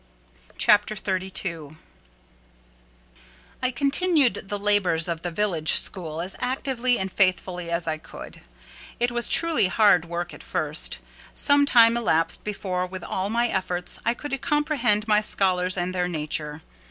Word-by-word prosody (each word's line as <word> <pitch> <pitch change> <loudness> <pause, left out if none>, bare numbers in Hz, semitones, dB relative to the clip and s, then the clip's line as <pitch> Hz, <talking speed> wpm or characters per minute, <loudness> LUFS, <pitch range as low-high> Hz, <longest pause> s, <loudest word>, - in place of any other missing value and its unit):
CHAPTER 210 +1 +3
XXXII 185 -6 -4 1.8
I 255 - +1
continued 280 - +1
the 205 - -3
labours 200 -5 +1
of 165 -1 -4
the 175 - -3
village 170 -4 +1
school 165 -4 +1
as 185 +2 -6
actively 255 -1 0
and 190 0 -4
faithfully 180 -2 -1
as 170 0 -1
I 155 -1 -2
could. - - -11 0.6
It 240 +1 0
was 240 0 -1
truly 330 - +4
hard 195 -4 +3
work 170 0 -5
at - - -12
first. - - -1 0.4
Some 285 0 +3
time 230 -3 +5
elapsed 165 -8 0
before, 185 -3 -3
with 185 -1 -8
all 190 +2 -3
my 235 +2 +1
efforts, 180 -2 -2
I 235 +1 0
could 270 -1 -5
comprehend 275 -7 0
my 210 -1 +3
scholars 185 -3 0
and 180 +1 -2
their 180 -1 -1
nature. 150 -2 -5
195 Hz, 140 wpm, -24 LUFS, 175-235 Hz, 1.8 s, time